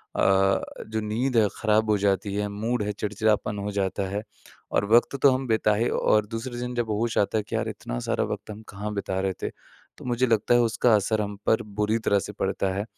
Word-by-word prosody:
अ, 95 0 +3 0.3
जो 110 0 -2
नींद 115 +4 -1
है 105 -2 +5
ख़राब 110 0 +2
हो 105 - +4
जाती 100 0 0
है 105 0 -1
मूड 110 +3 -2
है 105 - -1
चिड़चिड़ापन 105 0 0
हो 105 +1 -3
जाता 100 -1 -1
है, 100 +2 -2 0.5
और 100 - +1
वक़्त 120 +4 +5
तो 140 - +7
हम 130 0 -1
बिता 110 -1 +2
ही 115 +3 +1
और 105 -1 +2
दूसरे 120 +2 -5
दिन 125 0 -4
जब 120 -2 -1
होश 110 +2 -1
आता 105 +2 +2
है 105 - 0
कि - - -5
यार - - -1
इतना - - -5
सारा - - +1
वक़्त - - -8
हम 105 +1 -9
कहाँ 105 +1 -5
बिता 95 -2 -2
रहे 95 -1 0
थे? - - 0 0.5
तो - - -12
मुझे 125 +1 +1
लगता 115 +1 +2
है 120 - +6
उसका 115 0 +2
असर 105 +1 +1
हम 100 0 -4
पर 110 +1 +3
बुरी 105 +1 -1
तरह 100 -2 +2
से - - -7
पड़ता 95 -1 -1
है। 100 - -1
105 Hz, 230 wpm, -25 LUFS, 100-115 Hz, 0.5 s, तो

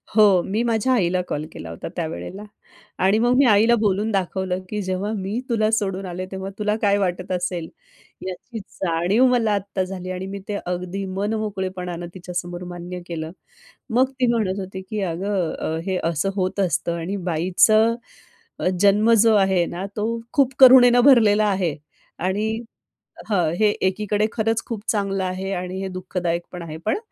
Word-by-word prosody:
हो, 205 -4 +6
मी 210 +4 -1
माझ्या 235 +2 +1
आईला 185 -5 +2
कॉल 150 +1 -3
केला 85 - -8
होता 80 - -7
त्यावेळेला. 165 - -5 0.6
आणि 200 +3 +4
मग 240 +2 +3
मी 280 - +5
आईला 225 +1 +5
बोलून 210 +1 +1
दाखवलं 190 -1 -1
की 210 -1 -2
"जेव्हा 190 +2 -2
मी 195 +4 -3
तुला 220 -2 +2
सोडून 195 -3 -1
आले 180 0 -5
तेव्हा 190 0 -5
तुला 210 0 +1
काय 200 -1 +3
वाटत 180 -1 -2
असेल, 180 -2 -2 0.6
याची 205 +6 -7
जाणीव 190 +4 +1
मला 240 -4 +2
आत्ता 200 -1 -2
झाली." 185 -1 -6
आणि 185 +1 -4
मी - - -5
ते 205 - -2
अगदी 180 +2 -3
मनमोकळेपणानं 190 -4 -3
तिच्यासमोर 175 -1 -5
मान्य 175 +1 -7
केलं. 160 -2 -5 0.7
मग 260 +1 +3
ती 255 - +3
म्हणत 205 -4 0
होती 190 0 -6
की 215 -1 -2
"अगं, 175 -3 -2
हे 190 -2 -1
असं 165 +2 0
होत 185 0 -1
असतं 170 -1 0
आणि 185 +5 -3
बाईचं 215 +7 +4 0.6
अ, - - 0
जन्म 205 +3 +4
जो 225 -1 +5
आहे 190 -3 +3
ना 180 +3 -4
तो 210 - 0 0.3
खूप 275 -2 +3
करुणेनं 245 -2 +8
भरलेला 215 -6 +6
आहे. 185 -6 0 0.4
आणि 200 +4 0 0.8
हां, 180 -7 +2
हे 215 - +5 0.2
एकीकडे 210 +2 0
खरंच 225 0 0
खूप 225 -3 -5
चांगलं 195 -2 0
आहे 185 +1 -3
आणि 180 +1 -4
हे 195 - -3
दुःखदायक 175 -2 -2
पण 180 - -6
आहे 160 -2 -7
पण, 220 - +1
195 Hz, 165 wpm, -22 LUFS, 180-215 Hz, 0.8 s, करुणेनं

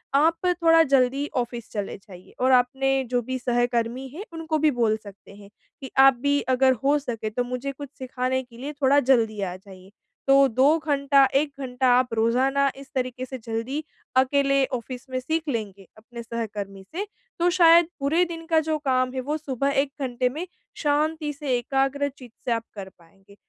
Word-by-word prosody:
आप 320 +4 +4
थोड़ा 330 -2 +4
जल्दी 275 0 +2
ऑफिस 240 -1 -3
चले 205 -2 -4
जाइए 190 -3 -15
और 260 +1 +3
आपने 265 +2 +2
जो 245 0 +1
भी 260 +2 -4
सहकर्मी 240 +1 -1
हैं 320 +10 -8
उनको 325 -1 -2
भी 310 +1 +4
बोल 225 -2 +2
सकते 200 -2 -14
हैं, 200 -1 -14 0.3
कि 265 - -8
आप 270 0 +8
भी 285 +1 +2
अगर 260 +1 +4
हो 285 +2 +4
सके 235 -6 -4
तो 245 +3 -2
मुझे 250 +3 -4
कुछ 280 +1 -9
सिखाने 260 0 -2
के 240 -2 -17
लिए 280 +5 -6
थोड़ा 275 +1 +5
जल्दी 230 -5 +2
आ 180 -2 -3
जाइए। 190 0 -15 0.4
तो 275 0 +6
2 265 +6 +3
घंटा 280 -1 +4
1 285 +1 +2
घंटा 260 -1 -1
आप 250 -2 -2
रोज़ाना 260 +5 +2
इस 275 +1 -12
तरीके 255 0 -2
से 260 +1 -7
जल्दी 230 +6 -4 0.3
अकेले 275 +1 +3
ऑफिस 250 +2 -9
में 255 0 -2
सीख 315 +5 -2
लेंगे, 200 -6 -4
अपने 235 +2 -10
सहकर्मी 210 -4 -5
से 400 +4 -2 0.3
तो 345 +1 +3
शायद 340 -1 +6
पूरे 300 +6 +2
दिन 330 -1 -7
का 325 -1 +3
जो 315 0 -1
काम 255 -3 0
है, 260 - -3
वो 290 +4 -2
सुबह 275 -3 -2
1 275 0 -4
घंटे 250 -1 0
में 310 +8 -5 0.4
शांति 300 +1 0
से 280 -4 -1
एकाग्र 270 +3 0
चित्त 255 -4 -15
से 245 - -1
आप 230 -1 0
कर 195 -2 -7
पाएँगे। 195 +3 -22
260 Hz, 185 wpm, -24 LUFS, 235-285 Hz, 0.4 s, आप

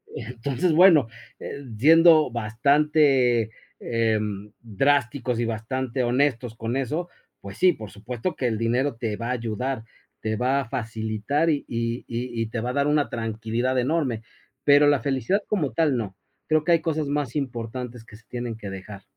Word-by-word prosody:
Entonces, 130 +8 -2
bueno, 165 -7 +6 0.3
eh, 140 - -7
siendo 160 +2 +6
bastante, 125 0 +2 0.3
eh, 115 -2 +1 0.4
drásticos 125 +1 0
y 120 - +1
bastante 125 +3 -2
honestos 125 -2 0
con 115 +3 -3
eso, 155 +7 -2 0.3
pues 100 +1 -9
sí, 180 -2 +5
por 110 -6 -9
supuesto 120 - -4
que 125 - -1
el 110 -2 -1
dinero 120 +3 0
te 115 -3 -3
va 115 - -4
a - - 0
ayudar, 120 +1 -3 0.4
te 110 0 -1
va 130 +4 +1
a - - -6
facilitar 110 +7 -1
y 145 -2 0
y 115 0 -2
y 115 -1 -3
te 115 +1 -4
va 125 - -2
a - - -6
dar 140 0 +1
una 150 -1 +2
tranquilidad 115 +3 -2
enorme, 130 -4 0 0.4
pero 145 0 +6
la 145 -2 +4
felicidad 140 - 0
como 165 -10 -1
tal 155 -6 +2
no, 100 -5 -4 0.3
creo 155 -1 +2
que 170 - +3
hay 165 - +3
cosas 155 -3 -1
más 145 -2 -2
importantes 120 -3 -4
que 110 - -14
se 115 - -17
tienen 120 -2 -4
que 100 -3 -7
dejar. 95 +1 -9
125 Hz, 170 wpm, -24 LUFS, 115-145 Hz, 0.4 s, bueno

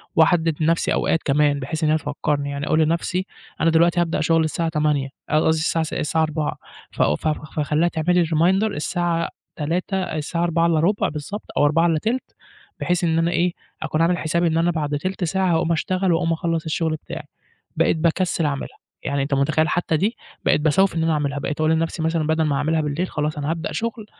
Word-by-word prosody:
وأحدد 160 -1 +3
نفسي 165 +2 +2
أوقات 165 - +1
كمان 145 0 +2
بحيث 155 +5 -4
إن 155 - +3
هي 155 - +4
تفكرني، 145 -1 -2
يعني 140 +1 -4
أقول 155 - +2
لنفسي 170 +3 0 0.4
أنا 165 - +4
دلوقتي 170 +2 +3
هابدأ 165 -2 0
شغل 165 0 +3
الساعة 165 +1 -1
20:00 150 -3 0 0.2
ق - - -3
قصدي 155 0 +3
الساعة 165 0 +1
س 155 - -6
الساعة 160 +1 0
16:00 155 -1 -2 0.3
ف - - -3
ف 75 - +1 0.3
فاخليها 155 +2 +1
تعمل 170 +1 0
لي 170 - +3
reminder 170 +5 +2
الساعة 170 +2 -1 0.3
تلاتة 175 +5 -2
الساعة 165 +1 -2
15:45 170 +3 +2
بالضبط 155 +8 -6
أو 145 - +4
15:40 165 - +1 0.4
بحيث 180 0 0
إن 165 -1 +2
أنا 170 +1 +1
إيه 175 0 +1 0.3
أكون 155 - -1
عامل 175 +2 +3
حسابي 170 +1 0
إن 160 0 +1
أنا 170 +1 +2
بعد 150 -3 -1
تلت 185 +4 -3
ساعة 190 +1 +1
هاقوم 165 +1 +1
اشتغل 185 +2 +1
وأقوم 165 0 +1
أخلّص 165 -1 -2
الشغل 160 0 -1
بتاعي، - - -8 0.5
بقيت - - +2
باكسل 170 0 +1
أعملها 140 -2 -3 0.3
يعني 140 0 -1
أنت 140 0 -2
متخيل 155 +3 +2
حتى 170 -3 0
دي، 210 +8 0 0.3
بقيت - - +3
باسوّف 170 +4 +3
إن 165 - 0
أنا 165 0 +2
أعملها 145 -2 -1
بقيت 150 +2 -4
أقول 155 +1 +3
لنفسي 165 +1 0
مثلًا 160 -1 0
بدل 160 0 +2
ما 145 -2 +1
هاعملها 155 +3 +1
بالليل 150 +5 -2
خلاص 150 0 -2
أنا 145 +2 -1
هابدأ 165 0 -3
شغل 230 -1 -3
160 Hz, 195 wpm, -22 LUFS, 150-170 Hz, 0.5 s, هي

